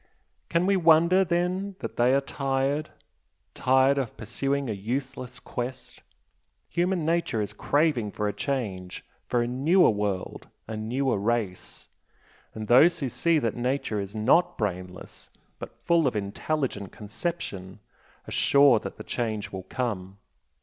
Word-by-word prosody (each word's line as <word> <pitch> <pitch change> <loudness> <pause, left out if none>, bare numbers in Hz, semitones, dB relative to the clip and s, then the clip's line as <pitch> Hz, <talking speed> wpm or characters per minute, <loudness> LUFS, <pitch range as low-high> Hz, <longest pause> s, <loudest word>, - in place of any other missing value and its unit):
"Can 170 +1 +2
we 200 +1 +3
wonder 170 +2 +5
then 180 +3 -1
that - - -6
they 120 +1 +3
are 140 - +3
tired? 135 +2 -1 0.6
tired 130 +2 +3
of 130 -5 -4
pursuing 135 +5 -2
a 110 - -1
useless 125 +4 -4
quest? 125 +1 -6 0.7
Human 175 0 0
nature 165 -8 0
is 105 0 -3
craving 145 -2 +1
for 105 +1 -2
a 105 - -1
change 100 -7 -4 0.2
for 120 -1 +1
a - - -2
newer 140 +7 +4
world 105 -3 -3 0.2
a 110 - -5
newer 120 +2 -1
race, 105 -3 -2 0.7
and 110 -1 -5
those 160 +9 +6
who 135 - -2
see 165 +7 +2
that 115 -7 -1
Nature 125 -3 -1
is 100 +1 -6
NOT 125 +11 +3
'brainless' 90 -3 -5 0.3
but - - -9
full 170 -4 +4
of 125 - -1
intelligent 105 +1 -2
conception, 105 - -5 0.5
are - - -8
sure 140 -5 +5
that - - -8
the - - -8
change 110 -3 -3
will 95 -1 -7
come!" 100 -6 -3
125 Hz, 145 wpm, -26 LUFS, 105-150 Hz, 0.7 s, those